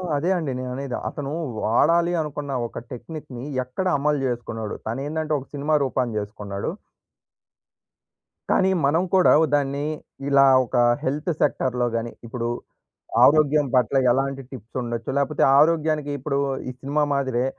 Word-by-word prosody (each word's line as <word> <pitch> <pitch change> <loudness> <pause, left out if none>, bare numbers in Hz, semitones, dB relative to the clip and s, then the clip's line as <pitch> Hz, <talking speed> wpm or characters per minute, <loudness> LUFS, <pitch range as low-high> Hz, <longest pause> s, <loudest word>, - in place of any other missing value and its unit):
అదే 150 +5 0
అండి 155 -6 -2
నేననేది. 130 +1 -4
అతను 140 -1 -5 0.3
వాడాలి 170 +9 +3
అనుకున్న 145 -2 -5 0.2
ఒక - - -7
టెక్నిక్‌ని 135 -1 -8 0.2
ఎక్కడ 130 +10 -3
అమలు 145 +1 +1
చేసుకున్నాడు? 115 -3 -4
తను 115 +4 -3
ఏందంటే 155 0 -2
ఒక 135 - -12
సినిమా 145 +2 +1
రూపాన్ని 125 -3 -1
చేసుకున్నాడు. 100 -1 -5 1.8
కానీ 190 - +3 0.2
మనం 160 +5 +2
కూడా 185 - +6
ఓ - - +5
దాన్ని 140 0 -1 0.4
ఇలా 140 -1 +6 0.2
ఒక 120 - -6 0.3
హెల్త్ 145 +6 -2
సెక్టార్‌లో 125 -3 +1
గాని 115 0 -2
ఇప్పుడు 115 0 -4 0.8
ఆరోగ్యం 150 0 +4
పట్ల 125 0 +3 0.2
ఎలాంటి 135 +1 -1
టిప్స్ 120 -3 -11
ఉండొచ్చు? 115 -1 -4
లేకపోతే 140 +1 0 0.2
ఆరోగ్యానికి 155 -1 +2
ఇప్పుడు 140 +1 -2 0.3
ఈ - - -2
సినిమా 145 +2 0
మాదిరే 130 -3 0
140 Hz, 135 wpm, -23 LUFS, 125-150 Hz, 1.8 s, కూడా